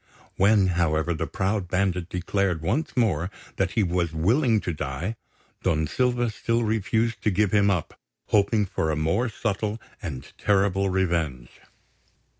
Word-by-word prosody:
When, 100 0 +4 0.2
however, 80 +1 +1
the 80 0 -3
proud 100 0 -1
bandit 90 -1 0
declared 90 -2 -1
once 145 - -1
more 95 -8 +2 0.3
that 95 -1 0
he 110 - +2
was 85 -2 0
willing 110 - +3
to 90 - -3
die, 75 +9 -4 0.5
Don 80 -1 +1
Silva 120 - 0
still 115 +3 0
refused 110 +1 0
to - - +2
give 105 0 +1
him 100 -1 +4
up, 90 -5 -2 0.3
hoping 105 +1 +3
for 80 -4 -2
a 80 - +1
more 80 +11 +1
subtle 110 0 -2 0.2
and 75 -10 -5
terrible 100 -1 +2
revenge. 85 -10 -1
95 Hz, 145 wpm, -25 LUFS, 85-110 Hz, 0.5 s, When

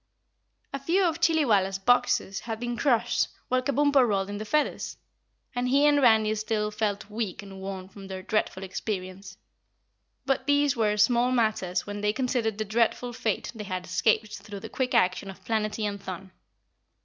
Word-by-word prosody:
A 275 - -2
few 340 +8 +2
of 330 -1 0
Chillywalla's 220 - +3
boxes 245 -2 +2
had 225 -2 -5
been 240 0 -3
crushed 240 -3 +2 0.2
while 255 0 +2
Kabumpo 280 +1 +3
rolled 200 -2 0
in 205 - -5
the 215 - -5
feathers, 300 +7 -1 0.6
and 245 0 -1
he 280 +3 +4
and 290 -1 +4
Randy 220 -3 +5
still 215 0 -1
felt 210 -2 -2
weak 210 -3 -3
and 195 -1 -10
worn 190 -1 -6
from 195 0 -12
their 190 -1 -6
dreadful 205 -2 -1
experience, 190 0 -5 0.9
but 270 0 0
these 285 -1 +3
were 210 -2 +1
small 240 +3 +3
matters 215 -7 0
when 205 0 -5
they 210 0 +1
considered 240 -4 -1
the 215 - -2
dreadful 235 +3 0
fate 220 -2 -2
they 215 -3 -7
had 185 -2 -4
escaped 215 +3 +1
through 200 -1 -9
the - - -7
quick 255 -1 -1
action 185 +2 +2
of 195 - -11
Planetty 215 -1 -1
and 200 -1 -5
Thun. 190 0 -7
215 Hz, 175 wpm, -27 LUFS, 195-245 Hz, 0.9 s, Randy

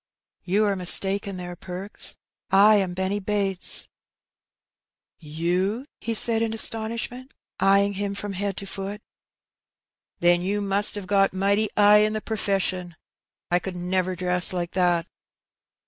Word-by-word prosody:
'^ - - -68 0.4
You 205 +4 +1
are 200 -1 0
mistaken 195 +2 0
there, 180 -1 -7
Perks; 185 +3 -1 0.3
I 205 +3 +6
am 185 -3 -1
Benny 190 +2 -2
Bates.^ 195 -2 +1
'^ - - -18 1.3
You! 175 +8 -2
^' - - -15
he 230 0 -3
said 225 0 +3
in 225 -1 -1
astonishment, 230 +4 0 0.2
eyeing 200 +1 +3
him 200 0 -4
from 200 0 -5
head 195 0 -3
to 200 - -6
foot. 195 +2 -6 1.2
^^Then 175 0 +3
you 200 +3 -1
must 200 +1 +2
'ave 200 - -6
got 195 0 +2
mighty 200 +3 +1
'igh 205 0 +6
in 215 0 +2
the 215 - -2
per 220 - -4
feshun. 185 -4 -2 0.6
I 175 - +3
could 185 0 -7
never 185 +1 -2
dress 180 0 +3
like 175 -1 -3
that. 175 -2 +1
195 Hz, 150 wpm, -24 LUFS, 180-205 Hz, 1.3 s, I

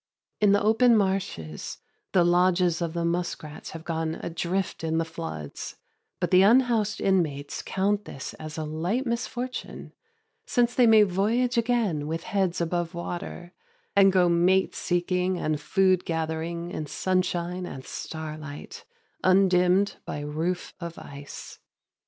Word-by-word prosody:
In 210 -1 +5
the 205 0 +3
open 225 +3 +5
marshes 190 - -2 0.3
the 180 - +4
lodges 175 -1 +3
of 165 -2 -2
the 170 -1 -1
muskrats 170 -3 -3
have 160 0 -8
gone 160 -1 -2
adrift 170 +2 -3
in 160 0 0
the 165 - +1
floods; 160 - -7 0.4
but - - -1
the 185 - +7
unhoused 225 0 +4
inmates 155 -7 0
count 200 +2 0
this 135 - -7
a 155 0 -5
light 175 - -1
misfortune, 245 +1 -4 0.5
since 245 -2 +2
they 245 -2 +5
may 220 -1 +7
voyage 215 +6 +1
again 225 -11 +1
with 165 +1 -3
heads 190 -3 0
above 170 0 -1
water, 175 0 -6 0.4
and 195 -1 +7
go 185 -1 +4
mate 180 +3 +3
seeking 180 +1 0
and 155 -3 -1
food 185 +3 +3
gathering 165 +1 -3
in 155 - -4
sunshine 180 0 -1
and 130 -5 -8
starlight, 155 -2 -7 0.4
undimmed 185 +1 +4
by 145 - -5
roof 160 +5 -3
of 170 -1 -6
ice. 140 0 -10
180 Hz, 135 wpm, -26 LUFS, 160-195 Hz, 0.5 s, the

